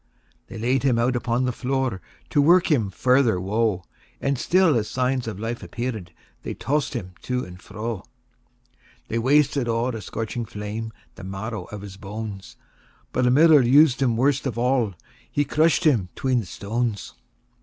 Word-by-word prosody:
X. - - -36
They - - -9
laid 125 +4 +1
him 130 -4 +2
out 125 +2 +1
upon 120 +1 0
the 125 - +1
floor, 130 -5 -2 0.3
To 145 - +4
work 170 +4 +5
him 115 -9 +2
farther 125 0 +2
woe; 100 0 0 0.4
And 140 0 0
still, 180 -2 +3
as 110 -2 0
signs 130 -1 -1
of 105 -3 -5
life 115 +2 -4
appear'd, 110 -8 -5 0.3
They - - -5
toss'd 145 +2 -1
him 95 -6 -5
to 125 0 -2
and 90 0 -12
fro. 110 +1 -5
XI. - - -28 1.0
They 115 - 0
wasted 140 +1 +3
o'er 115 +2 0
a 110 - -5
scorching 115 +4 -4
flame 105 +2 -5 0.2
The 95 - -12
marrow 100 +4 -5
of 105 -4 -8
his 100 -2 -9
bones; 100 0 -7 0.6
But 125 - +1
a - - +5
miller 150 +3 +6
us'd 135 +1 +5
him 120 -4 +2
worst 135 +2 +2
of 120 - -4
all 120 -5 +1 0.4
He 145 - +1
crush'd 155 +3 +2
him 120 - +3
'tween 130 -2 +1
the 110 - -4
stones. 110 +2 -3
120 Hz, 175 wpm, -24 LUFS, 105-135 Hz, 1.0 s, miller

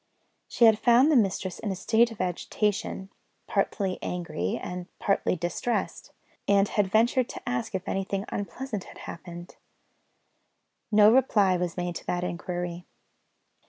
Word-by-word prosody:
She 235 - +3
had 220 -2 +6
found 250 +5 +5
the - - +4
mistress 195 -5 +1
in 215 - -3
a - - -2
state 225 +5 +3
of 225 - -11
agitation, 190 +2 -2 0.3
partly 190 -3 -1
angry, 165 - -3
and 180 0 -6
partly 195 -2 +1
distressed; 175 +7 -3 0.4
and 200 0 +4
had 205 -2 +1
ventured 235 +5 +2
to - - -7
ask 125 +7 -2
if 190 0 -4
anything 195 +1 -2
unpleasant 210 0 -5
had - - -13
happened. 175 +1 -9 1.3
No 210 +1 +7
reply 210 -8 +4
was 180 -1 -2
made 175 0 -2
to - - -12
that 175 0 -1
inquiry. 175 0 -4
195 Hz, 140 wpm, -27 LUFS, 180-220 Hz, 1.3 s, No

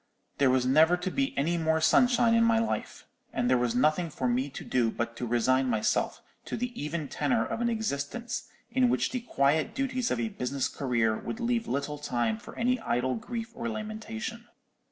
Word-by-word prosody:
There 140 -2 +5
was 130 -1 +2
never 160 +7 +5
to 180 +1 -3
be 275 +4 -1
any 170 +5 +1
more 160 0 +2
sunshine 230 +8 +4
in 230 0 +5
my 230 0 +4
life: 225 0 -2 0.3
and 120 - 0
there 130 0 +4
was 120 -1 0
nothing 155 +6 +2
for 130 -3 -2
me 125 +3 0
to 140 - -8
do 120 -3 +2
but 115 +1 -3
to 120 - -3
resign 130 +3 +2
myself 110 -3 0 0.2
to - - -4
the 245 +1 -3
even 150 -5 -4
tenor 235 - 0
of 225 +1 -3
an 235 - +2
existence 220 - -3 0.2
in 255 0 +3
which - - +1
the 255 - -1
quiet 160 - +1
duties 255 -2 -1
of - - -1
a 225 - -1
business 135 - -2
career 120 -6 0
would 225 - -5
leave 235 -1 0
little 140 +2 -2
time 120 -6 -1
for - - -11
any 250 +2 +1
idle 130 - 0
grief 225 - -5
or 235 0 -4
lamentation. 220 +1 -5
160 Hz, 195 wpm, -29 LUFS, -, 0.3 s, There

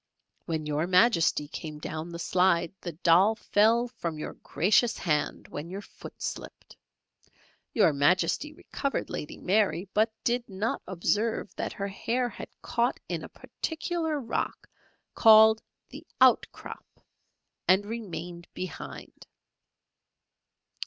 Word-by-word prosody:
When 160 -2 -2
Your 150 +2 -1
Majesty 180 -5 +3
came 155 0 -7
down 155 +2 -5
the 170 - -6
slide, 175 0 +2
the 175 - -5
doll 180 +6 +4
fell 225 +2 +3
from 170 -10 -5
your 150 - -5
gracious 220 +6 +2
hand 150 -4 -1
when 150 +3 -6
your 195 +3 -6
foot - - -12
slipped. - - -7 1.0
Your 200 -9 +4
Majesty 175 - +2
recovered 280 -2 -4
Lady 150 - -5
Mary, 190 -2 +1
but 220 +2 +3
did 240 0 0
not 200 +4 -2
observe 210 +4 -1
that - - -3
her 200 -1 -4
hair 240 +5 -1
had 210 - -9
caught 240 +1 0
in - - -3
a - - -8
peculiar 320 -1 -3
rock, 240 - -3 0.5
called 220 -1 +7 0.3
the - - -10 0.2
'Outcrop,' - - +1 0.7
and 190 +2 +4
remained 175 -6 -6
behind! 185 -1 -8
195 Hz, 120 wpm, -28 LUFS, 170-230 Hz, 1.0 s, called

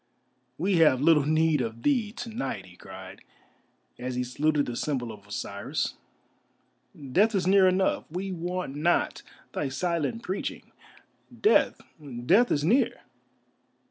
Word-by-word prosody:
"We 185 +1 +1
have 150 -6 +5
little 150 -1 +4
need 155 -2 +3
of 115 -1 -5
thee 235 -7 +2
to 235 +1 -7
night," 135 - -4
he 90 -1 -16
cried, 95 0 -11 0.8
as 125 0 -4
he 125 - 0
saluted 145 +4 +1
the 120 - -5
symbol 125 -4 -2
of 100 -2 -13
Osiris. 100 0 -3 1.2
"Death 210 - +3
is 185 - +1
near 190 0 +6
enough, 185 +1 +1
we 185 +4 -4
want 180 -4 -4
not 165 +4 +1 0.3
thy 140 - -2
silent 170 - -2
preaching. 190 +2 -4 0.7
Death, 430 - +4 0.4
Death 220 - +5
is 145 - +1
near!" 240 - +2
160 Hz, 135 wpm, -27 LUFS, 125-190 Hz, 1.2 s, near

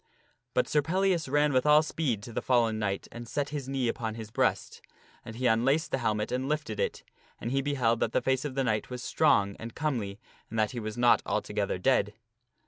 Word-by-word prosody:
But 125 - +2
Sir 150 - +2
Pellias 175 -1 +1
ran 145 +1 +3
with 130 -1 +3
all 150 +1 +7
speed 135 -9 -2
to 120 - -9
the - - -2
fallen 115 -3 +2
knight 100 -2 -2
and 120 0 -8
set 145 +4 -2
his 140 -3 -5
knee 135 -2 0
upon 110 -1 -2
his 110 -2 -8
breast. - - 0 0.4
And 115 - -9
he 130 +2 -3
unlaced 135 +8 +2
his 135 - -1
helmet 105 -2 0
and 130 +2 -1
lifted 150 -8 -2
it. - - -2 0.4
And 115 - -4
he 135 +1 +1
beheld 130 -5 +1
that 115 - 0
the - - +2
face 130 0 +1
of 145 -3 -4
the 135 - +1
knight 110 -4 -1
was 125 -1 -6
strong 100 0 +2
and 115 0 -8
comely 115 -10 -2 0.3
and 115 - -5
that 110 -1 +2
he 120 - -4
was 110 0 -5
not 120 0 +5
altogether - - -1
dead. 105 +1 +1
125 Hz, 220 wpm, -29 LUFS, 110-140 Hz, 0.4 s, all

